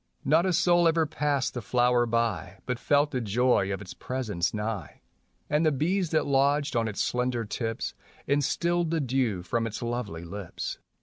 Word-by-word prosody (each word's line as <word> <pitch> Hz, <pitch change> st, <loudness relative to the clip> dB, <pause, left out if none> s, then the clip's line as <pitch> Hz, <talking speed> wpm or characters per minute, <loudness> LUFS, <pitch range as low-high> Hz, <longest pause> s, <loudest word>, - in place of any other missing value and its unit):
Not 160 Hz, +6 st, +4 dB
a 185 Hz, -, +1 dB
soul 175 Hz, 0 st, +4 dB
ever 165 Hz, 0 st, +3 dB
passed 145 Hz, -2 st, -1 dB
the 125 Hz, -, -4 dB
flower 120 Hz, +1 st, +2 dB
by 110 Hz, -6 st, -1 dB
But 125 Hz, -1 st, -2 dB
felt 145 Hz, +2 st, +2 dB
the 130 Hz, -, -1 dB
joy 115 Hz, -2 st, +2 dB
of 100 Hz, +1 st, -3 dB
its 90 Hz, -, -9 dB
presence 110 Hz, -10 st, -2 dB
nigh. 105 Hz, -6 st, -4 dB, 0.5 s
.\nd 150 Hz, +2 st, +3 dB
the 155 Hz, -, +4 dB
bees 175 Hz, +6 st, 0 dB
that 155 Hz, -, +1 dB
lodged 140 Hz, +1 st, +2 dB
on 115 Hz, -1 st, +2 dB
its 105 Hz, -, -2 dB
slender 125 Hz, -1 st, -1 dB
tips 115 Hz, +1 st, -3 dB, 0.3 s
Instilled 170 Hz, +5 st, +1 dB
the 165 Hz, 0 st, 0 dB
dew 125 Hz, -, 0 dB
from 115 Hz, +3 st, -1 dB
its 110 Hz, -, -5 dB
lovely 115 Hz, -8 st, -3 dB
lips. 100 Hz, 0 st, -6 dB
125 Hz, 175 wpm, -27 LUFS, 110-145 Hz, 0.5 s, Not